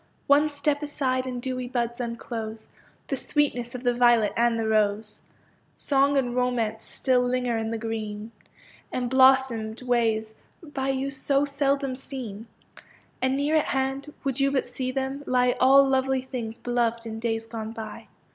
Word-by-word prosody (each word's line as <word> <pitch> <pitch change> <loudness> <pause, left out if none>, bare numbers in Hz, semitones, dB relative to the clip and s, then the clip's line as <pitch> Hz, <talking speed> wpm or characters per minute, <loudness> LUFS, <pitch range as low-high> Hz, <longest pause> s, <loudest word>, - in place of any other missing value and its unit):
One 290 +2 +4
step 290 0 -1
aside 260 -3 -1
and 250 -1 -4
dewy 255 0 -3
buds 240 -1 -2
unclose 230 -2 -5 0.4
The - - -2
sweetness 250 -5 -1
of 250 - -6
the 245 -1 +2
violet 240 -3 +4
and 235 -1 +2
the 225 - -1
rose; 215 0 0 0.5
Song 280 0 +2
and 245 -3 0
romance 235 -3 0
still 255 -2 +1
linger 250 -1 0
in 225 0 -2
the 230 - -2
green, 220 -1 -5 0.6
Emblossomed 255 -3 +3
ways 225 -3 +1 0.3
by 270 -4 -3
you 270 +1 -1
so 275 +1 +1
seldom 280 -1 0
seen, 240 -5 -7 0.7
And 260 +1 +1
near 290 +3 +1
at 305 - +2
hand, 270 +2 -2
would 270 -1 -2
you 275 0 +3
but 275 -1 0
see 255 +1 -4
them, 265 +1 -3
lie 250 -1 +3
All 275 +1 +7
lovely 265 -1 +1
things 235 -3 -5
beloved 235 -2 -1
in 220 -1 -5
days 225 -1 -1
gone 225 -1 -6
by. 220 -1 -8
250 Hz, 155 wpm, -26 LUFS, 230-270 Hz, 0.7 s, All